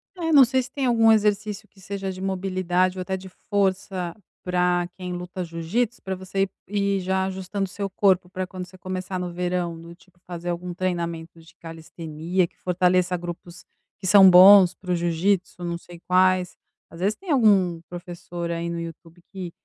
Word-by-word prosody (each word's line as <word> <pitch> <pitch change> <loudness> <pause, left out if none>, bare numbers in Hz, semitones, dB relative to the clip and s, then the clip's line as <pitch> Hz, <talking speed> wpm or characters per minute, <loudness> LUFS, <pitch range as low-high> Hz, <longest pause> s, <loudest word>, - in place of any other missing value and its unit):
É, 330 -3 -2
não 280 -3 +8
sei 260 +1 +1
se 250 - -11
tem 275 -1 -2
algum 225 -2 +5
exercício 210 0 +1
que 200 - -24
seja 195 0 -4
de 185 - -9
mobilidade 185 -1 0
ou - - -3
até 190 +1 -3
de 190 0 -11 0.2
força 190 -3 -1 0.3
pra 180 -1 +1
quem 180 -1 -6
luta 180 +1 -5
jiu-jítsu, 175 +9 -2
pra 190 0 -4
você 190 +1 -2 0.3
i 200 -1 0
ir - - -1
já 190 +1 0
ajustando 190 +1 -3
seu 200 +1 -5
corpo 190 -2 +2
pra 185 0 -4
quando 185 0 -7
você 185 +1 -16
começar 185 0 -5
no 180 -1 -4
verão, 175 -1 -2
do 170 +1 -11
tipo 180 0 -24
fazer 175 0 -6
algum 175 +1 -4
treinamento 170 -3 -3
de 165 - -19
calistenia 165 +2 -3
que - - -36
fortaleça 180 0 +1
grupos 175 0 -9 0.3
que 190 - -8
são 195 -1 +8
bons 185 0 +9
para 180 -1 -6
o - - +3
jiu-jítsu, 175 +2 0
não 170 0 -3
sei 170 0 -14
quais, 185 0 +3 0.3
às 165 - -13
vezes 205 +3 +1
tem 370 - -7
algum 195 - +3
professor 175 -1 -7
aí 170 0 -3
no 170 0 -4
YouTube 165 +1 -10
que 185 -3 -6
185 Hz, 185 wpm, -24 LUFS, 175-195 Hz, 0.3 s, bons